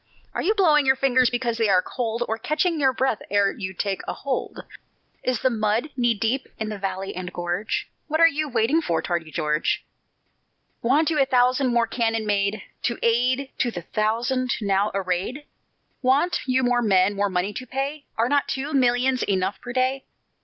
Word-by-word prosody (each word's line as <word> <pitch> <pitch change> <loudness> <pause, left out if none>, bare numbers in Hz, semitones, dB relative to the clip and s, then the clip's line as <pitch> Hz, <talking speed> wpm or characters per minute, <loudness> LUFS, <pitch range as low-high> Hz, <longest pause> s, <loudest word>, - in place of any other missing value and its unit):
Are - - -2
you 425 +4 +1
blowing 305 -8 +4
your 265 - +5
fingers 260 -2 +3
because 240 -1 -2
they 225 -2 +2
are 185 -1 +4
cold, 235 -1 -2
Or 225 0 -2
catching 310 +5 0
your 270 -2 +4
breath 260 -3 0
ere 200 0 +3
you 190 -3 -5
take 195 +1 -2
a - - -2
hold? 270 -2 -4 0.6
Is 255 -3 -1
the 260 - +3
mud 220 +5 0
knee 240 -3 +2
deep 230 +6 -1
in 215 -1 -3
valley 195 0 -4
and 180 0 -5
gorge? 175 +4 -2 0.2
What 315 +1 -1
are 330 - +8
you 310 -1 -1
waiting 240 +6 +2
for, 165 - -1
tardy 170 -3 -2
George? 150 0 -1 1.0
Want 295 +7 +2
you 300 -3 +2
a - - +4
thousand 255 +1 +3
more 235 -1 +3
cannon 225 -1 -1
made, 205 0 0 0.2
To 235 - 0
add 250 +4 +2
to 245 - +2
the 175 -7 -6
thousand 240 +6 0
now 200 -1 +1
arrayed? 195 +9 -2 0.6
Want 275 +7 +2
you 260 0 +2
more 245 0 +2
men, 195 -3 +3
more 200 0 +1
money 185 +2 -1
to 255 +3 -7
pay? 275 +3 -3
Are 230 +1 +2
not 285 +1 +2
two 280 +3 -3
millions 255 0 +2
enough 190 0 -1
per 245 - -7
day? 260 +2 0
240 Hz, 185 wpm, -24 LUFS, 205-265 Hz, 1.0 s, are